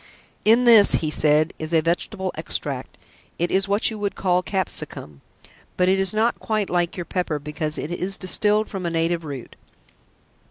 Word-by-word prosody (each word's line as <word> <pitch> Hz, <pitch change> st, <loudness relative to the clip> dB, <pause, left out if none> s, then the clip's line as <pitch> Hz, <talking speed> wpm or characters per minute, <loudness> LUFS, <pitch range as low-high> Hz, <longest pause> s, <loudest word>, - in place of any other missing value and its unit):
"In 230 Hz, +3 st, +5 dB
this," 225 Hz, -4 st, +8 dB
he 155 Hz, -2 st, -1 dB
said, 155 Hz, +1 st, +2 dB
"is 155 Hz, +1 st, -5 dB
a 160 Hz, -, +4 dB
vegetable 185 Hz, +3 st, -2 dB
extract. -, -, -5 dB, 0.4 s
It 175 Hz, +1 st, -1 dB
is 195 Hz, +1 st, +1 dB
what 205 Hz, +3 st, +1 dB
you 220 Hz, -, -7 dB
would 205 Hz, -1 st, -3 dB
call 180 Hz, -1 st, +1 dB
capsicum, 160 Hz, -, -3 dB, 0.6 s
but 180 Hz, -, +2 dB
it 190 Hz, +1 st, +3 dB
is 190 Hz, -1 st, +2 dB
not 225 Hz, +2 st, 0 dB
quite 215 Hz, -3 st, -2 dB
like 175 Hz, -1 st, 0 dB
your 175 Hz, -, -4 dB
pepper 175 Hz, -5 st, -2 dB
because 150 Hz, +1 st, -3 dB
it 155 Hz, -, -4 dB
is 185 Hz, +3 st, 0 dB
distilled 210 Hz, +3 st, +1 dB
from 190 Hz, -3 st, -5 dB
a -, -, 0 dB
native 165 Hz, 0 st, -1 dB
root. 140 Hz, -5 st, -8 dB
180 Hz, 175 wpm, -22 LUFS, 160-200 Hz, 0.6 s, this